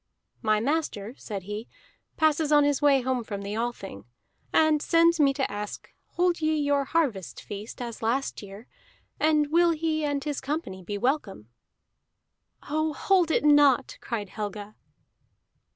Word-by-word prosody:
"My 215 -2 +2
master," 245 -5 -2
said 200 -8 -6
he, 210 +4 -6 0.5
"passes 310 -1 +2
on 295 -1 +6
his 285 0 +1
way 280 -2 +4
home 255 -1 -1
from 200 -2 -6
the 200 +1 -4
Althing, 220 - -5 0.5
and 310 -2 +3
sends 335 +1 +3
me 280 -2 +5
to 270 -2 -1
ask: 205 0 -7 0.2
hold 350 -1 +1
ye 310 0 +1
your 285 -1 +1
harvest 260 - -1
feast 205 +2 -8
as 235 -2 -7
last 245 +5 -1
year, 200 +2 -11 0.5
and 300 -1 +2
will 340 +1 +4
he 315 -1 -1
and 285 -2 -1
his 290 -1 -3
company 275 - -4
be 205 +3 -5
welcome?" 205 - -2 1.2
"Oh, 310 +1 0
hold 360 +3 +2
it 310 - +1
not!" 290 -3 +4
cried 210 -4 -4
Helga. 210 0 -6
275 Hz, 150 wpm, -26 LUFS, 210-310 Hz, 1.2 s, on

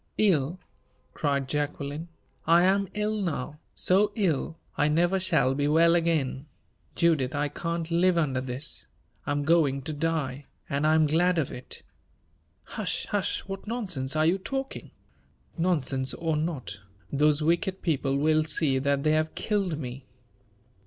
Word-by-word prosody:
"Ill!" 175 -5 +2 0.5
cried 140 -3 0
Jacqueline; 145 +2 -3 0.4
"I 170 +1 +6
am 195 +1 +3
ill 210 0 -1
now 150 -4 -3 0.2
so 205 +3 +2
ill, 165 -5 0 0.2
I 145 - +2
never 175 +5 +2
shall 165 -8 +2
be 145 +1 0
well 165 +3 +5
again! 155 -5 0 0.5
Judith, 155 -5 +2
I 145 0 0
can't 170 +2 -4
live 175 +1 +3
under 135 -6 +1
this. 130 +3 -4 0.4
I - - 0
am 145 0 0
going 145 -4 +2
to 155 - -4
die; 145 -3 -2 0.2
and 140 +2 0
I 155 - +4
am 160 -1 +4
glad 175 +4 +2
of 155 -5 0
it." 125 - -9 0.8
"Hush, 210 -6 -3
hush! 205 -2 0
what 195 +1 -8
nonsense 180 - -2
are 155 0 +3
you 180 +4 +3
talking?" 270 +7 -5 0.7
"Nonsense 140 -7 0
or 165 -2 -1
not, 150 -9 -3 0.3
those 150 +3 +2
wicked 175 +4 0
people 140 -4 0
will 155 +2 +3
see 150 -4 +2
that 140 +1 0
they 155 - +3
have 155 0 0
killed 195 -7 -1
me!" 130 -2 -7
155 Hz, 150 wpm, -27 LUFS, 140-175 Hz, 0.8 s, I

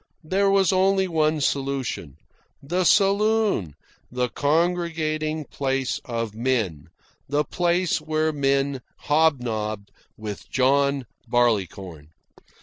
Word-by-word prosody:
There 195 +5 +1
was 195 -2 +3
only 190 0 +3
one 155 -2 +1
solution: 135 - -2 0.5
the 175 +6 0
saloon, 200 - +2 0.4
the 125 0 -1
congregating 155 0 0
place 135 -1 -2
of 115 -3 -3
men, 110 - -1 0.4
the 145 +1 +1
place 175 +1 0
where 155 0 0
men 140 -1 0 0.2
hobnobbed 115 -9 0 0.3
with 105 -2 -7
John 140 +1 +2 0.2
Barleycorn. 95 -9 -1
140 Hz, 95 wpm, -24 LUFS, 120-165 Hz, 0.5 s, was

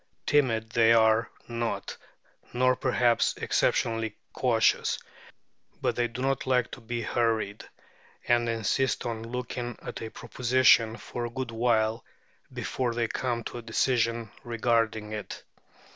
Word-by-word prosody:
Timid 115 -6 +2
they 115 0 +5
are 110 0 +4 0.2
not, 120 -1 -3 0.6
nor, 130 +1 +3
perhaps, 120 -2 +2
exceptionally 115 -2 0 0.2
cautious, 115 -4 +2 0.8
but - - 0
they 120 0 +1
do 120 +2 -6
not 135 -1 0
like 125 -2 +2
to 130 - -9
be 120 +1 -4
hurried, 110 -3 0 0.6
and 120 -1 +3
insist 115 +4 0
on 115 -2 -3
looking 120 0 -5
at - - -7
a 110 - -5
proposition 120 -2 +3
for 120 0 -5
a - - -7
good 125 0 -4
while 115 -1 +1 0.5
before 125 -3 -2
they 120 -1 +1
come 120 0 -2
to 120 - -6
a - - -7
decision 115 -1 0
regarding 115 -2 0
it. 105 -2 -6
115 Hz, 130 wpm, -28 LUFS, 115-125 Hz, 0.8 s, they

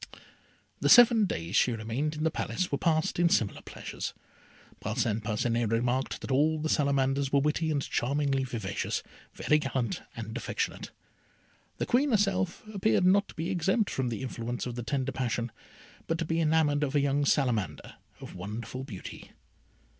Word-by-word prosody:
The - - +1
seven 235 -3 +8
days 85 - -3
she 125 - +4
remained 115 +8 -2
in 155 - -3
the 160 - +2
Palace 185 +3 -2
were 140 - +1
passed 160 0 +1
in 175 -1 +4
similar 110 -10 +1
pleasures. - - -6 0.6
Parcin 110 0 -1
Parcinet 115 +1 0
remarked 120 +4 0
that - - -5
all 150 +4 +3
the 155 +1 -2
Salamanders 140 -1 +1
were 140 - +4
witty 150 +3 0
and 145 -3 0
charmingly 135 +1 0
vivacious, 125 -4 -3 0.3
very 150 - +2
gallant 130 -6 -2
and 110 0 -6
affectionate. 135 - -3 0.9
The - - -1
Queen 265 +4 +2
herself 195 -5 +1
appeared 195 -2 +2
not 200 +2 +4
to - - -13
be 170 +3 -2
exempt 190 +4 +1
from 130 -2 -1
the 115 +2 -4
influence 120 -1 -4
of 125 - -4
the 120 - -4
tender 130 +3 -1
passion, 120 -3 -2 0.6
but 165 - 0
to 165 - -2
be 165 +1 0
enamoured 155 -2 +2
of 145 0 -2
a - - +5
young 140 +1 +1
Salamander 125 - 0 0.3
of - - -9
wonderful 110 +7 -6
beauty. 105 -8 -9
140 Hz, 165 wpm, -29 LUFS, 120-160 Hz, 0.9 s, seven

